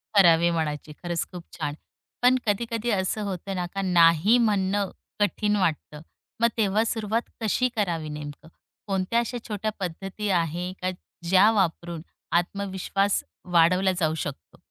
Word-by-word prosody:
करावे 170 -3 +6
मनाचे, 150 -2 -2
खरंच 175 -1 -1
खूप 175 -2 -8
छान. 150 -3 -2 0.5
पण 250 +1 +6
कधी-कधी 230 +2 -1
असं 190 +3 -1
होतं 190 +1 -4
ना, 180 - -1
का 195 +2 -4
नाही 175 +4 +5
म्हणणं 200 -1 0 0.3
कठीण 210 0 +1
वाटतं. 155 -5 -1 0.4
मग 235 - +6
तेव्हा 210 0 +2
सुरुवात 225 0 -2
कशी 250 +4 +1
करावी 170 -7 -1
नेमकं, 150 +1 -8 0.4
कोणत्या 195 +4 +1
अशा 240 +1 -2
छोट्या 215 0 -2
पद्धती 195 +3 -4
आहे, 175 +3 -2
का 185 - 0 0.4
ज्या 195 +3 +6
वापरून 170 -2 -1 0.4
आत्मविश्वास 195 +2 -1 0.3
वाढवला 180 +3 +4
जाऊ 155 -2 +1
शकतो? 140 - -6
190 Hz, 135 wpm, -26 LUFS, 170-210 Hz, 0.5 s, करावे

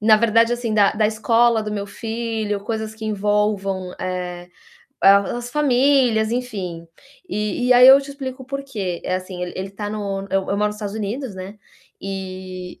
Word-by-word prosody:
na 215 0 +6
verdade, 230 +1 +3
assim, 240 -2 -2
da 205 -2 +4
da 215 0 +2
escola 230 +1 +3
do 210 0 -4
meu 200 -1 -3
filho, 225 -2 -3
coisas 220 +1 -4
que 220 - -9
envolvam, 205 -3 0
eh, 180 -1 -4 0.5
as 200 +5 +4
famílias, 255 -5 +3
enfim. 195 -9 -4 0.4
E 210 - -2
e - - +7
aí 250 +1 +8
eu 270 +1 +9
te 280 0 -9
explico 260 -2 -7
o - - -28
porquê. 260 -10 -4
É 185 - 0
assim, 185 -1 -7
ele 180 - -4
ele 190 +1 -4
está 205 +1 -5
no 200 -2 -3
eu 195 0 +2
eu 200 - +1
moro 210 +1 +2
no - - -4
Estados 210 -1 -6
Unidos, 220 +2 -4
né, 190 +3 -8 0.4
e 185 -1 -7
210 Hz, 180 wpm, -21 LUFS, 195-235 Hz, 0.5 s, eu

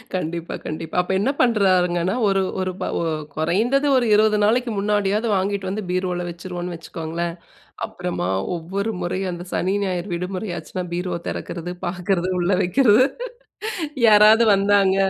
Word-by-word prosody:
கண்டிப்பா 170 -1 -3
கண்டிப்பா. 160 +1 -5
அப்போ 180 - -4
என்ன 255 +7 +1
பண்ணுறாருங்கன்னா, 185 -5 +2
ஒரு 195 -1 +2 0.2
ஒரு 185 0 -1
ப - - 0 0.5
குறைந்தது 220 - +1
ஒரு 245 - +2
20 215 0 +4
நாளைக்கு 240 +2 +2
முன்னாடியாவது 205 +2 +1
வாங்கிட்டு 195 0 -1
வந்து 210 +2 -3
பீரோவுல 180 -1 -1
வச்சுருவோம்ன்னு 175 0 -6
வச்சுக்கோங்களேன். 165 +1 -5 0.5
அப்புறமா 175 - -4 0.3
ஒவ்வொரு 195 +6 -3
முறையும் 185 +1 -2
அந்த 175 +1 -7
சனி, 190 +2 0
ஞாயிறு 185 0 -2
விடுமுறை 185 +3 -4
ஆச்சுன்னா 180 +3 -5
பீரோ 180 -1 -2
திறக்கிறது, 175 +1 -5
பார்க்கிறது, 180 0 -1
உள்ளே 180 +2 +2
வைக்கிறது 240 +5 +5 1.0
யாராவது 215 +2 +7
வந்தாங்க 195 -1 +3
185 Hz, 130 wpm, -22 LUFS, 175-205 Hz, 1.0 s, யாராவது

